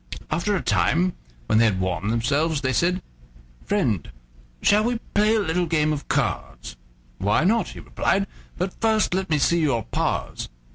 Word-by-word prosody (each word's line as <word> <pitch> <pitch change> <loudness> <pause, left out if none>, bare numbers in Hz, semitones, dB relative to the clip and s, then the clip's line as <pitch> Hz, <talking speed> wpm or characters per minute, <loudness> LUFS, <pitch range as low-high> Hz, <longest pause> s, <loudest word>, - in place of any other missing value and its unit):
After 205 +5 +1
a 185 - -2
time, 175 +3 +2 0.3
when 110 - +3
they 115 - +5
had 100 -4 +1
warmed 95 +1 -1
themselves, 140 +7 +1
they 130 -1 0
said: 180 +4 +1 0.6
"Friend, 120 - 0 0.5
shall 210 +1 +5
we 240 +1 0 0.2
play 210 +2 +4
a - - +3
little 180 -2 0
game 155 -1 +2
of 145 - -5
cards?" - - -2 0.4
"Why 105 +10 +2
not?" 215 +2 +2
he - - -9
replied; 195 +1 0 0.3
"but 185 +1 -2
first 220 -4 +2
let 190 -1 -1
me 155 - +2
see 170 +4 +2
your 135 -8 +1
paws." - - -2
165 Hz, 170 wpm, -24 LUFS, 120-195 Hz, 0.6 s, they